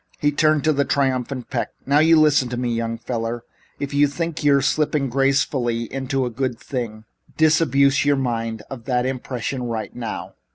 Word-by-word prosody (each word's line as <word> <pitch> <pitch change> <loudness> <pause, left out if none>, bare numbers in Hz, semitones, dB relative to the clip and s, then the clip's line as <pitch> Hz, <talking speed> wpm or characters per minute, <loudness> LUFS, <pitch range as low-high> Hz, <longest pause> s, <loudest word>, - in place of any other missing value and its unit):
He 145 - +1
turned 155 0 +2
to 155 - +3
the 140 0 +2
triumphant 130 -2 -1
Peck. - - -2
"Now, 140 +2 +3
you 160 +1 +6
listen 145 -5 +4
to 120 - -4
me, 120 -1 -1
young 115 0 -2
feller. 115 0 -4 0.4
If 140 0 -4
you 145 +1 +4
think 165 +2 -4
you're 140 -1 +5
slipping 150 -3 +1
gracefully 135 -3 +1
into 135 0 -1
a 120 - -3
good 125 -1 -2
thing, 115 -5 -5 0.3
disabuse 140 -3 +4
your 145 0 +3
mind 115 -4 -2
of 120 -4 -8
that 125 0 0
impression 130 0 -3
right 115 -4 -4
now. 115 -3 -5
135 Hz, 175 wpm, -22 LUFS, 120-145 Hz, 0.4 s, you